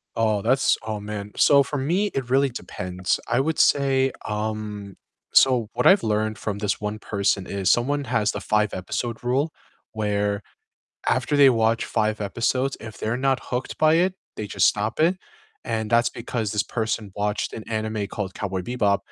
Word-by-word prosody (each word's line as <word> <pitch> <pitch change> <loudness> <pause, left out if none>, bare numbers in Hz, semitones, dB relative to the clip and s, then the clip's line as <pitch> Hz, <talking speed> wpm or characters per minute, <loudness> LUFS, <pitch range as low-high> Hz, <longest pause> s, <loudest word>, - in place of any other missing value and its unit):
Oh, 110 -3 +1
that's 130 +5 +3
Oh, 110 -1 -3
man, 105 0 -6
so 140 -1 +6
for 145 +2 -4
me, 175 +10 +1
it 130 -3 -3
really 135 +1 +3
depends, 90 -6 -3
I 120 +3 +1
would 155 +3 0
say, 135 -2 +3
um 105 -2 -4 0.4
so, 125 -5 +5
what - - -1
I've 195 +1 +7
learned 110 0 0
from 100 -1 -4
this 105 -2 -1
one 105 0 -3
person 100 -2 0
is 100 -2 -1
someone 140 +4 +2
has 115 -4 +1
the - - -5
five-episode 105 +2 -1
rule, 135 +6 0 0.4
where 105 -1 -1 0.7
after 145 - +1
they 140 -2 +7
watch 115 -1 +2
5 110 -1 0
episodes, 125 +6 0
if 110 -1 -10
they're 110 +3 -1
not 135 0 +1
hooked 125 +1 -4
by 155 0 +5
it, 180 +3 +3 0.2
they 105 - -4
just 95 -2 +2
stop 105 +5 0
it, 175 +4 +3 0.5
and 110 -2 -2
that's 120 +1 +3
because 115 -2 -3
this 105 - +1
person 110 -2 -3
watched 105 0 -1
an 110 - -7
anime 110 -2 -2
called 100 -2 -5
Cowboy 95 -2 -3
Bebop, 100 -1 +1
110 Hz, 175 wpm, -24 LUFS, 105-130 Hz, 0.7 s, I've